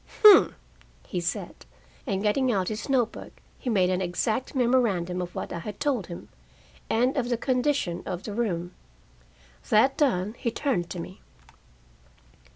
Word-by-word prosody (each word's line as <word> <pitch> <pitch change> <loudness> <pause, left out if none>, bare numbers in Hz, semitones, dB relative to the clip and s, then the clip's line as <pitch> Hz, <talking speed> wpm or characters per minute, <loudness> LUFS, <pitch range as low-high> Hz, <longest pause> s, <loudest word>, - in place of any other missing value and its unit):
"Humph!" 420 -2 +8 0.5
he 180 - -3
said, 170 - -4 0.4
and 195 +1 -1
getting 250 +5 +2
out 190 -4 0
his 215 +5 -5
note 245 -4 +2
book, - - -10 0.3
he 255 - -4
made 185 -5 +3
an 185 0 0
exact 215 +9 -1
memorandum 220 -9 +1
of 180 0 -6
what - - -4
I 170 - -4
had 205 +5 -7
told 275 - 0
him, 170 - -9 0.6
and 250 +4 +2
of 250 -4 -1
the 240 - +1
condition 255 -7 0
of 180 -1 -5
the 210 - -5
room. 180 -6 -2 1.0
That 260 +6 +4
done, 215 -8 +1
he 240 - 0
turned 225 - -1
to 180 - -5
me. 180 +3 -9
215 Hz, 160 wpm, -26 LUFS, 180-255 Hz, 1.0 s, Humph